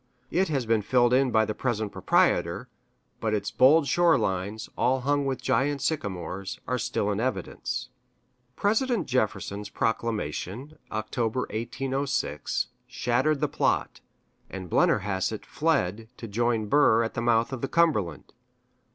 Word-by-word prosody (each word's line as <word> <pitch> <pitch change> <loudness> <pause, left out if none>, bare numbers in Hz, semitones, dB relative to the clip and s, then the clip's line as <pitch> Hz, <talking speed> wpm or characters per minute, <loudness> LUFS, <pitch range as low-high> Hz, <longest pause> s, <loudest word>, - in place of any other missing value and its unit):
It 190 +3 +2
has 135 -6 -1
been 115 -1 +2
filled 120 +3 +3
in 130 +1 +4
by 110 -2 +3
the 110 - -3
present 110 -3 -2
proprietor, - - +1 0.5
but 110 -1 0
its 100 -1 -2
bold 145 +4 +5
shore 170 +4 +4
lines, 100 +4 -2
all 130 +2 +1
hung 145 +1 +1
with 135 -1 -3
giant 135 +2 +1
sycamores, 100 - -3
are 125 +1 0
still 105 -1 -1
in 100 - -1
evidence. 125 +2 -3 0.7
President 220 - +1
Jefferson's 105 -4 -1
proclamation 115 - -3
(October, 110 +3 -1
1806) 130 - -2 0.2
shattered 130 +5 0
the - - +2
plot, - - 0 0.5
and 95 -3 -7
Blennerhassett 100 +2 +1
fled 115 - 0
to 115 - -7
join 115 +1 0
Burr 115 -1 +4
at 115 - -3
the - - -2
mouth 120 +1 +2
of 130 - -4
the 135 - -1
Cumberland. 135 - +1
120 Hz, 135 wpm, -27 LUFS, 105-135 Hz, 0.7 s, bold